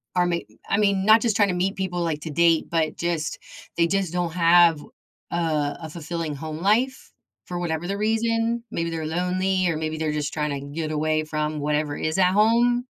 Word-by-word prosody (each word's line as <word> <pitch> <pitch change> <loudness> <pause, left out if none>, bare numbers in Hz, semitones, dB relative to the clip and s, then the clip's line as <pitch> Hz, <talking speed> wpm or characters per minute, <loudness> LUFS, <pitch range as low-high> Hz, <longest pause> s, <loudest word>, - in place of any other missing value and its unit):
are 180 0 +3
mee 170 -1 -2 0.2
I 200 - +2
mean, 200 -2 +2
not 220 +1 +7
just 230 -4 +1
trying 205 -2 +4
to - - 0
meet 190 +3 0
people, 180 -2 -2
like, 155 -3 -2
to 160 - -6
date, 165 +1 +3
but 160 -2 0
just 170 -3 -2 0.4
they 170 0 +3
just 190 -2 -1
don't 175 -2 -1
have, 170 -2 +5 0.5
uh, 155 -4 0
a 160 - -6
fulfilling 165 -1 -4
home 155 +2 -6
life 235 +8 +1 0.3
for 175 - -5
whatever 170 0 -2
the 200 +1 -2
reason. 230 +2 0
Maybe 165 0 -2
they're 160 -1 -3
lonely 185 +2 0
or 160 - -1
maybe 155 0 -3
they're 155 -1 -1
just 150 -1 -3
tryna 145 -2 -3
get 155 -1 -3
away 155 0 0
from 155 0 -3
whatever 150 0 -1
is 160 +3 -2
at 180 0 +4
home. 240 +4 +3
170 Hz, 200 wpm, -24 LUFS, 155-195 Hz, 0.5 s, not